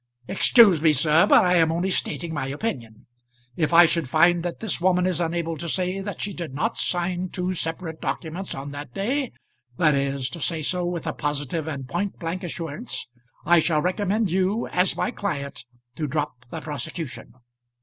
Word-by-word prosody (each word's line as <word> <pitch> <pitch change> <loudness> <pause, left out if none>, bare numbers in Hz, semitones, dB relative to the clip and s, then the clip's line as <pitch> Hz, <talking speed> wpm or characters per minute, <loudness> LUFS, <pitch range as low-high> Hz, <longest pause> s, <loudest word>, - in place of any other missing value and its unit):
"Excuse 195 -3 +5
me, 155 -1 +5
sir, 150 +3 +4
but - - +6
I 180 0 +4
am 165 -1 +4
only 175 +3 0
stating 170 -2 -2
my 140 -3 -2
opinion. 135 - -5 0.5
If 155 -2 0
I 170 +1 +8
should 165 -5 0
find 170 +4 +4
that 175 0 -4
this 220 -5 -1
woman 180 0 +3
is 180 -2 0
unable 165 -1 -1
to 170 +2 -4
say 185 +2 -1
that 200 +1 -6
she 200 - -3
did 170 -7 -6
not 220 +11 0
sign 180 +1 -1
two 180 +1 -2
separate 165 -1 -4
documents 175 +3 -4
on 140 +1 -6
that 145 -3 -8
day 255 +6 -1 0.5
that 155 -2 +4
is, 140 -1 -1
to 170 - -7
say 160 -1 0
so 180 +3 0
with 175 -2 -3
a - - -2
positive 145 +2 -2
and 140 -4 -5
point 200 +9 -2
blank 175 +2 -4
assurance, 170 - -5 0.4
I 170 +2 +6
shall 155 -2 +1
recommend 200 +2 0
you, 190 +5 +1
as 180 +1 +1
my - - 0
client, 145 - -4 0.3
to 155 - -1
drop 140 -3 -3
the 160 - -6
prosecution." 155 -2 -6
170 Hz, 185 wpm, -24 LUFS, 150-185 Hz, 0.5 s, I